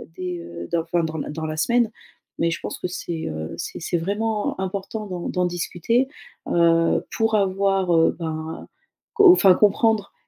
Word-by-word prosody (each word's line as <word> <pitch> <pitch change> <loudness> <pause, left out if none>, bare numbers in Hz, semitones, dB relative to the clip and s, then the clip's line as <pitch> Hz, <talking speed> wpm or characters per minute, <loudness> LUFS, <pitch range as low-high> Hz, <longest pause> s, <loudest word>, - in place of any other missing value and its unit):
dès, 180 -1 -4
heu, 85 - -8
d'enfin 170 0 0
dans 160 0 -3
la 145 - -4
dans 160 +1 -4
la 155 0 -4
semaine. 235 +6 +2 0.5
Mais 165 0 +2
je 170 - -3
pense - - -5
que - - -2
c'est, 170 -2 -5
heu, 80 0 -5
c'est - - -5
c'est 175 - -1
vraiment 205 +4 -2
important 200 +3 -4
d'en 180 -2 -5
d'en 180 -1 0
discuter, 175 +8 0 0.4
heu, 165 -1 +3
pour 225 -1 +2
avoir, 195 -2 +1
heu, 165 0 +4
ben 160 -1 -5 0.5
co 405 -5 +8
enfin 195 - +6
comprendre 210 0 +2
180 Hz, 170 wpm, -23 LUFS, 165-205 Hz, 0.5 s, co